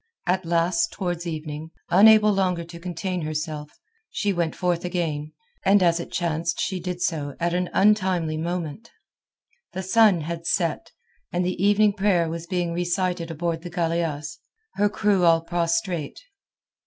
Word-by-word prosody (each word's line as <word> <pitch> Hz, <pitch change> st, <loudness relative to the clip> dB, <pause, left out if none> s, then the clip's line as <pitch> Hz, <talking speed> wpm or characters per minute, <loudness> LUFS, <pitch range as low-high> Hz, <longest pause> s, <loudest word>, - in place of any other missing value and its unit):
At 185 Hz, 0 st, 0 dB
last 170 Hz, -, +1 dB
towards 175 Hz, -3 st, -3 dB
evening, 155 Hz, -1 st, -5 dB, 0.2 s
unable 210 Hz, +3 st, +7 dB
longer 180 Hz, -3 st, 0 dB
to 170 Hz, 0 st, -11 dB
contain 180 Hz, +1 st, -3 dB
herself, 155 Hz, -1 st, -5 dB, 0.3 s
she 205 Hz, -2 st, -1 dB
went 170 Hz, -3 st, -1 dB
forth 175 Hz, -2 st, 0 dB
again, 160 Hz, -4 st, -2 dB, 0.3 s
and 195 Hz, 0 st, +5 dB
as 170 Hz, -1 st, +3 dB
it 170 Hz, -, -7 dB
chanced 170 Hz, -1 st, -1 dB
she 190 Hz, -2 st, -1 dB
did 180 Hz, 0 st, -4 dB
so 145 Hz, -4 st, -2 dB
at 170 Hz, 0 st, 0 dB
an 180 Hz, 0 st, 0 dB
untimely 185 Hz, -6 st, +2 dB
moment. 170 Hz, +5 st, -4 dB, 0.8 s
The 190 Hz, -, -4 dB
sun 200 Hz, -2 st, +4 dB
had 170 Hz, +2 st, -5 dB
set, 170 Hz, -4 st, 0 dB, 0.4 s
and 175 Hz, 0 st, 0 dB
the 185 Hz, 0 st, -2 dB
evening 205 Hz, +1 st, +4 dB
prayer 195 Hz, -4 st, +2 dB
was 165 Hz, +1 st, -5 dB
being 175 Hz, -2 st, -1 dB
recited 175 Hz, 0 st, -1 dB
aboard 165 Hz, 0 st, -2 dB
the 175 Hz, -, -7 dB
galeasse, 165 Hz, -5 st, -2 dB, 0.3 s
her 205 Hz, +1 st, +2 dB
crew 205 Hz, -3 st, +1 dB
all 165 Hz, -1 st, +5 dB
prostrate. 170 Hz, -1 st, -1 dB
175 Hz, 150 wpm, -24 LUFS, 165-185 Hz, 0.8 s, unable